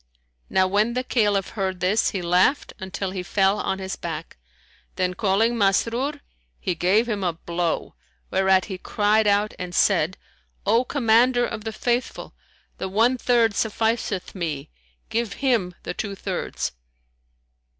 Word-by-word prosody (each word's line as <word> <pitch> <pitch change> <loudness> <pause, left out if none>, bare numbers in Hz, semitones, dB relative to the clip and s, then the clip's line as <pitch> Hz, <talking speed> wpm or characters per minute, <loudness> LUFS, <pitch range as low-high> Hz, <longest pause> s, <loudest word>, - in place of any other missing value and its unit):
Now 190 0 +3
when 210 +5 +1
the 255 - 0
Caliph 205 -6 +1
heard 190 -3 -3
this, 190 +5 +2
he 190 -4 -4
laughed 180 +11 +2
until 190 0 -4
he 190 -1 -4
fell 195 +2 +2
on 190 - -1
his 190 0 -4
back; - - -6 0.6
then 180 -1 0
calling 215 +4 +2
Masrur, 235 +8 +1 0.4
he 185 - -1
gave 190 +7 +2
him 210 -4 -2
a 175 -2 +1
blow, 170 0 -2 0.4
whereat 190 -1 +3
he 190 -3 -6
cried 210 +2 +2
out 205 +1 +2
and 180 -1 -5
said, 185 -3 +3 0.5
"O 225 +5 +4
Commander 245 -1 +3
of 220 -2 -6
the 220 - -2
Faithful, 240 +3 -2 0.5
the 190 - -3
one 225 +6 +3
third 235 -3 +2
sufficeth 220 -3 -1
me: 160 - -4 0.4
give 230 -2 -1
him 230 -10 0
the - - -4
two 200 +1 -4
thirds." - - -3
205 Hz, 145 wpm, -24 LUFS, 185-230 Hz, 0.6 s, O